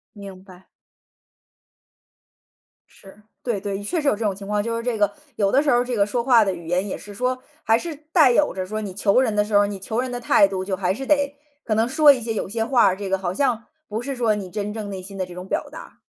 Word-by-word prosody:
明 200 -2 -9
白。 185 -1 -16 2.2
是， 200 +2 -17 0.2
对 230 -5 -1
对， 200 -1 -3
确 325 - -1
实 290 - -2
有 280 - +4
这 220 +2 -4
种 200 -2 0
情 200 0 -9
况。 210 0 0
就 230 +1 -2
是 230 - -4
这 240 -3 -1
个， 205 -1 +2 0.2
有 200 -2 +1
的 275 - +4
时 300 - 0
候 245 0 +3
这 250 -1 -3
个 200 -1 +3
说 235 +3 -2
话 235 -4 +5
的 195 - 0
语 170 -2 -10
言 180 +3 0
也 - - -4
是 205 - -11
说， 255 +4 -1 0.2
还 225 +1 +4
是 325 +4 -5 0.2
带 305 -8 +6
有 295 +4 +2
着 185 -1 -3
说 215 +3 -4
你 195 -3 -6
求 205 +5 +3
人 220 -5 0
的 210 - +3
时 210 - -7
候， 205 - +6
你 200 -1 -5
求 220 +5 -3
人 255 -1 -4
的 245 - -3
态 200 -4 +4
度 190 -1 -3
就 190 -1 -1
还 185 0 0
是 265 +5 -6
得 285 -1 +1 0.3
可 215 - -1
能 225 +2 +2
说 295 +2 +6
一 260 - +1
些 225 0 -3
有 210 - -3
些 225 +1 -1
话 245 -1 +4
儿， 190 0 +2
这 200 -2 -5
个 195 - +1
好 185 -1 -3
像 235 -2 0 0.2
不 215 +2 -4
是 275 +2 -4
说 230 -4 +1
你 195 -3 -6
真 210 +1 -4
正 215 -2 -5
内 190 -2 -6
心 195 +1 -10
的 185 - -1
这 180 - -11
种 180 +1 -8
表 - - -2
达。 - - -12
210 Hz, 290 characters per minute, -22 LUFS, 195-245 Hz, 2.2 s, 带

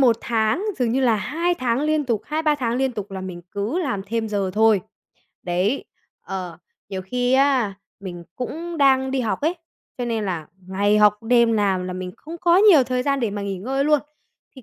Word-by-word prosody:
1 240 -4 +5
tháng, 230 - 0
dường 240 -2 +1
như 265 - +1
là 240 -4 +3
2 325 - -1
tháng 250 -5 0
liên 305 0 +1
tục, 230 -5 0
2-3 305 0 +1
tháng 245 -4 -1
liên 265 0 0
tục 210 -4 -6
là 190 -1 -5
mình 185 -2 -7
cứ 215 - -2
làm 250 - -2
thêm 225 0 -2
giờ 200 -2 -1
thôi. 220 -2 +4 0.6
Đấy, 185 +9 0 0.4
ờ, 180 -4 -6 0.3
nhiều 190 -2 -4
khi 245 +6 -1
á, 260 -6 +3 0.3
mình 175 -3 -7
cũng 330 +7 -5
đang 265 -1 +4
đi 265 0 0
học 225 -3 -1
ấy, 320 +4 +1 0.4
cho 245 - -1
nên 225 -3 -1
là 175 -5 -3 0.2
ngày 205 +2 +2
học, 210 -1 +6
đêm 235 0 +4
làm 195 -4 +1
là 185 - -4
mình 180 0 -5
không 325 +3 -9
có 345 0 +4
nhiều 390 -9 +7
thời 250 0 -1
gian 275 0 0
để 230 -4 0
mà 205 0 -4
nghỉ 195 -2 -3
ngơi 270 +8 -1
luôn. 300 -1 +4 0.6
Thì 260 - -11
230 Hz, 210 wpm, -22 LUFS, 200-270 Hz, 0.6 s, nhiều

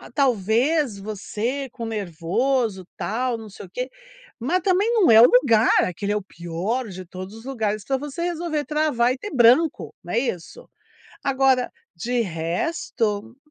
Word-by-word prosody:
talvez 245 - +2
você 215 +6 -4
com 235 -1 -7
nervoso 210 - -1
tal, 240 +2 -1
não 220 -1 -10
sei 200 - -10
o - - -23
quê, 250 +7 -4 0.5
mas 335 +10 0
também 390 +5 +2
não 385 - +5
é 220 - +9
o 245 - +8
lugar, 245 -3 +5 0.2
aquele 200 +3 -3
é - - +1
o - - -3
pior 185 +7 -3
de 185 -1 -8
todos 185 +3 -8
os 225 +2 -12
lugares 215 -6 -2
pra 270 -1 0
você 295 +4 -5
resolver 335 -3 -2
travar 300 -6 +1
e - - -7
ter 415 - -6
branco, 260 +5 +4
não 175 - -6
é 230 - +3
isso? 245 - -5 0.6
Agora, 265 -2 +2 0.2
de 240 +8 -1
resto, 215 - -2
235 Hz, 160 wpm, -23 LUFS, 205-275 Hz, 0.6 s, é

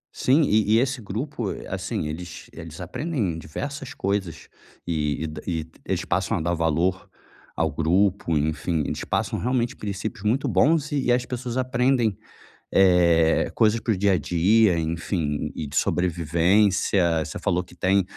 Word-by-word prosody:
Sim, 140 +5 +3
e 110 -4 +3
e - - +5
esse 130 0 -1
grupo, 115 +2 -4
eh, - - -7
assim, 75 - -3
eles 85 +3 -7
eles 80 0 -9
aprendem 105 - -2
diversas 140 - -6
coisas 95 -3 -2 0.4
e 75 -2 -1
e - - -2
da 75 - -7
e 80 -3 -2 0.2
eles - - -2
passam - - 0
a - - -2
dar 85 +2 0
valor 85 +3 0 0.5
ao - - 0
grupo, 90 0 +1
enfim, 75 +2 -1
eles - - -3
passam - - -1
realmente 120 0 0
princípios 100 -1 -5
muito 120 +6 +1
bons 150 0 +2
e 145 -2 0
e 120 - +3
as 125 0 +2
pessoas 125 0 -4
aprendem, 125 -3 +1 0.6
eh, 85 -4 +4
coisas 110 +1 +3
para 115 -1 0
o 95 - -3
dia 100 0 +3
a - - +3
dia, 90 +4 +3
enfim, 80 -2 -2
e 80 - -4
e - - -6
de 70 - -9
sobrevivência. 85 0 +2
Você 80 - -6
falou 90 +1 0
que 90 - -17
tem 95 +2 +2
95 Hz, 170 wpm, -24 LUFS, 80-115 Hz, 0.6 s, e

